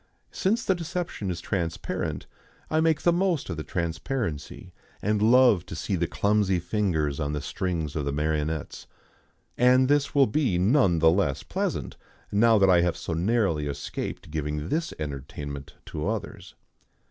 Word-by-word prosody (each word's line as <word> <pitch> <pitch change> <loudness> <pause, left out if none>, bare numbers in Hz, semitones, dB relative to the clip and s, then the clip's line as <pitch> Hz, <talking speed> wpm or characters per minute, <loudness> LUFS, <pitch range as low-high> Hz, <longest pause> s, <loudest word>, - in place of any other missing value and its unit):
Since 220 +6 0
the 190 - +3
deception 175 - -4
is 90 -2 -3
transparent 85 -5 -3 0.5
I 155 - +3
make 160 -2 +2
the 175 - +4
most 175 - 0
of 80 - -4
the 80 - -4
transparency, 85 - -4 0.3
and 105 +1 0
love 120 -4 +5
to - - -6
see 95 - -2
the 85 -1 0
clumsy 100 0 +1
fingers 85 -6 -1
on 75 -1 -1
the 75 - -1
strings 85 -3 -3
of 75 -3 -1
the 70 - -1
marionettes. 75 +1 -2 0.7
And 125 +1 +5
this 145 0 +1
will 140 -1 +6
be 120 - +1
none 95 - +3
the 80 0 +5
less 85 -7 0
pleasant - - -3 0.3
now 110 +2 +5
that 100 -1 +5
I 90 -2 +6
have 85 -1 0
so 85 - -4
narrowly 90 -4 +1
escaped 70 +1 -5
giving 75 0 -3
this 165 +2 -1
entertainment 70 -1 -6
to - - -4
others. - - -5
90 Hz, 160 wpm, -26 LUFS, 80-125 Hz, 0.7 s, will